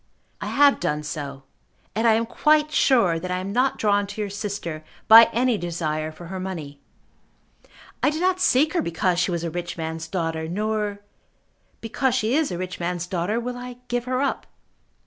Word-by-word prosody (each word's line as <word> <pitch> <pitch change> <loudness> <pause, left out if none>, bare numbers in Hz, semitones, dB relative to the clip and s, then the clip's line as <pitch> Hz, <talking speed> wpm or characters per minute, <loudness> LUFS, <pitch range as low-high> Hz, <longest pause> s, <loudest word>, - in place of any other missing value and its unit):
I - - -4
have 285 0 +4
done 150 0 -1
so, 140 -2 -6 0.5
and 225 +3 +1
I 225 - +6
am 230 +1 +1
quite 300 +5 +2
sure 230 - +3
that 185 - -6
I 180 - -1
am 190 +2 -4
not 255 +3 +1
drawn 205 -1 +1
to 205 +2 -8
your 205 -2 -2
sister 195 -6 -5 0.2
by 225 +1 +10
any 240 -2 +1
desire 155 -3 -3
for 165 +2 -12
her 190 +2 -6
money. 160 -7 -6 1.2
I - - +4
did 305 +1 -3
not 370 +1 +1
seek 305 -3 +3
her 350 - +1
because 175 +1 0
she 180 - +1
was 170 -2 -2
a 170 - -3
rich 175 +1 -5
man's 160 0 -4
daughter, 165 -3 -2
nor, 210 +2 -2 0.8
because 245 +3 0
she 220 +3 0
is 315 -1 +2
a 175 - -3
rich 185 0 -5
man's 175 0 -2
daughter, 180 +5 -1
will 245 +1 -4
I 245 0 -8
give 245 0 -1
her 255 +1 0
up. 280 - -2
200 Hz, 190 wpm, -24 LUFS, 170-245 Hz, 1.2 s, by